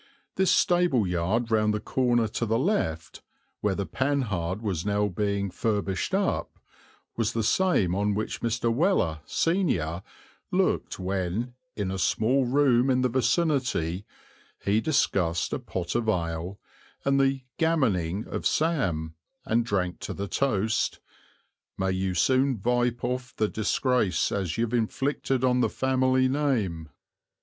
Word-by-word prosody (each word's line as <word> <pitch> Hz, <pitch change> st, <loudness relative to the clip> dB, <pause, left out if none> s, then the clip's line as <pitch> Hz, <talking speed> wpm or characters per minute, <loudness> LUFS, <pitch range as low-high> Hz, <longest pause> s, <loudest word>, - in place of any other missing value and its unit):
This 190 Hz, 0 st, +2 dB
stable 175 Hz, -, +3 dB
yard 95 Hz, +7 st, 0 dB
round 105 Hz, -1 st, +2 dB
the -, -, -1 dB
corner 120 Hz, 0 st, +1 dB
to 115 Hz, +2 st, -2 dB
the 110 Hz, +1 st, +2 dB
left, 125 Hz, -, -1 dB, 0.4 s
where 105 Hz, -2 st, 0 dB
the 100 Hz, -, -2 dB
Panhard 105 Hz, -11 st, -1 dB
was 95 Hz, -6 st, -2 dB
now 105 Hz, 0 st, +1 dB
being 100 Hz, 0 st, -1 dB
furbished 100 Hz, -2 st, -1 dB
up, -, -, -1 dB, 0.6 s
was 115 Hz, -2 st, 0 dB
the 115 Hz, -, 0 dB
same 110 Hz, -, +2 dB
on 100 Hz, +1 st, 0 dB
which 110 Hz, -, -3 dB
Mr. 115 Hz, 0 st, 0 dB
Weller, 125 Hz, -, +1 dB
senior, 95 Hz, -, 0 dB, 0.5 s
looked -, -, 0 dB
when, 95 Hz, +5 st, -2 dB, 0.2 s
"in 100 Hz, -3 st, -2 dB
a 95 Hz, -, -3 dB
small 125 Hz, +9 st, +2 dB
room 130 Hz, -1 st, +3 dB
in 130 Hz, -1 st, +3 dB
the 125 Hz, -, +2 dB
vicinity," 125 Hz, -, 0 dB, 0.6 s
he 105 Hz, +2 st, +2 dB
discussed 95 Hz, -, +1 dB
a -, -, -1 dB
pot 90 Hz, -2 st, -4 dB
of 115 Hz, -2 st, 0 dB
ale 85 Hz, 0 st, -2 dB, 0.5 s
and 140 Hz, 0 st, +3 dB
the 135 Hz, -1 st, +1 dB, 0.2 s
"gammoning" 110 Hz, -, +1 dB
of -, -, -1 dB
Sam, 95 Hz, -, 0 dB, 0.3 s
and 115 Hz, +2 st, +2 dB
drank 95 Hz, -6 st, -1 dB
to -, -, -5 dB
the 100 Hz, 0 st, -4 dB
toast, 110 Hz, -3 st, 0 dB, 0.8 s
"May 95 Hz, 0 st, 0 dB
you 95 Hz, 0 st, -1 dB
soon 130 Hz, +7 st, +2 dB
vipe 120 Hz, +2 st, 0 dB
off 125 Hz, 0 st, -3 dB
the 110 Hz, -, +1 dB
disgrace 110 Hz, 0 st, +1 dB
as 95 Hz, -3 st, -2 dB
you've 115 Hz, 0 st, -1 dB
inflicted 130 Hz, +2 st, 0 dB
on 125 Hz, -1 st, +3 dB
the 125 Hz, -, +2 dB
family 130 Hz, 0 st, +2 dB
name." 115 Hz, -, -1 dB
110 Hz, 140 wpm, -27 LUFS, 95-130 Hz, 0.8 s, stable